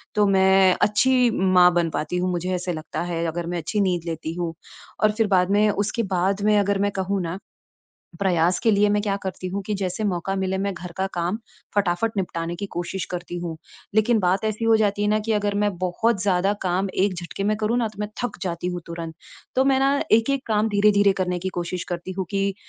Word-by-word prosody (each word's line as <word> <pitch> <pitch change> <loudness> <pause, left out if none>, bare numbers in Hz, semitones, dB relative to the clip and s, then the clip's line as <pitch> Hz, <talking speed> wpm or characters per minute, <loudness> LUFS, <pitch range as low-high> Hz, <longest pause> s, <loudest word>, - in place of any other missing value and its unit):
तो 210 - +4
मैं 190 -1 +5
अच्छी 250 +4 +4
माँ 185 -2 +5
बन 170 -1 +1
पाती 155 +2 -2
हूँ, 180 +1 0
मुझे 180 +1 -2
ऐसे 180 0 -3
लगता 155 -1 -5
है, 170 0 -1
अगर 170 +1 -3
मैं 175 0 -2
अच्छी 170 +6 -1
नींद 180 -4 0
लेती 165 -1 -4
हूँ। 170 -1 -3 0.5
और 215 - +5
फिर 215 0 +1
बाद 185 -2 +3
में 210 +1 +4
उसके 205 +3 -1
बाद 190 +3 +1
में 210 0 +4
अगर 200 -1 +1
मैं 205 0 +1
कहूँ 195 0 -1
ना, 175 +2 -4 0.8
प्रयास 180 -2 +2
के 225 - +3
लिए 205 0 +4
मैं 205 0 +2
क्या 200 -2 0
करती 185 -1 -5
हूँ 195 +2 -3
कि 210 +2 -3
जैसे 195 +1 -2
मौका 195 -1 -1
मिले, 190 0 -1
मैं 200 +1 -1
घर 175 0 -8
का 190 - 0
काम 175 +4 -1 0.4
फ़टाफ़ट 200 +2 +1
निपटाने 170 -3 -2
की 200 - -4
कोशिश 175 +2 -3
करती 175 0 -5
हूँ। 170 -2 -5 0.4
लेकिन 220 +2 +3
बात 190 +1 +1
ऐसी 215 +1 -1
हो 225 0 +5
जाती 205 -1 +1
है 205 - +2
ना 215 +1 +3
कि 225 - +1
अगर 205 -1 0
मैं 205 0 +2
बहुत 185 +4 0
ज़्यादा 195 0 +2
काम 185 +1 0
एक 195 0 +1
झटके 175 +3 -5
में 215 +1 +1
करूँ 215 +2 0
ना, 230 -2 +1
तो 210 -2 -16
मैं 210 - -2
थक 245 -4 -3
जाती 175 -2 -3
हूँ 180 -1 -3
तुरंत। 165 -1 -6 0.4
तो 260 - +3
मैं 270 -1 +3
ना 275 +1 +2
एक-एक 260 +5 +3
काम 215 0 +1
धीरे-धीरे 205 -1 +4
करने 180 -1 0
की 185 +2 -3
कोशिश 175 0 -3
करती 175 +1 -4
हूँ 190 - 0
कि 195 0 0
190 Hz, 225 wpm, -23 LUFS, 180-210 Hz, 0.8 s, मैं